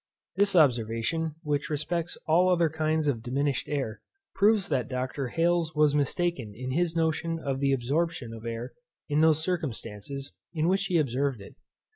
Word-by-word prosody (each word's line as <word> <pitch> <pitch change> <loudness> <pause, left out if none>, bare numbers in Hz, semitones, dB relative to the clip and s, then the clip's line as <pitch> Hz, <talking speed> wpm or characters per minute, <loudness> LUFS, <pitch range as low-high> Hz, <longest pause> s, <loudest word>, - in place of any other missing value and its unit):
This 200 0 +3
observation, 140 +3 +2
which 150 0 -1
respects 160 +3 -2
all 175 +4 +4
other 170 -3 +3
kinds 155 0 0
of 125 -6 0
diminished 135 +2 -1
air, 135 -7 -2 0.3
proves 205 -1 +3
that 125 -2 0
Dr. 130 +1 -2
Hales 165 +2 +1
was 150 -1 +4
mistaken 145 - 0
in 130 +3 -5
his 170 +3 0
notion 165 0 0
of 135 -4 -3
the 140 0 +2
absorption 135 0 -1
of 110 -1 -9
air 115 +2 -5 0.4
in 150 +1 +2
those 160 -1 +4
circumstances 140 - -4 0.2
in 160 0 +1
which 195 +2 +2
he 175 - +1
observed 135 -3 0
it. 100 - -12
150 Hz, 160 wpm, -28 LUFS, 130-165 Hz, 0.4 s, all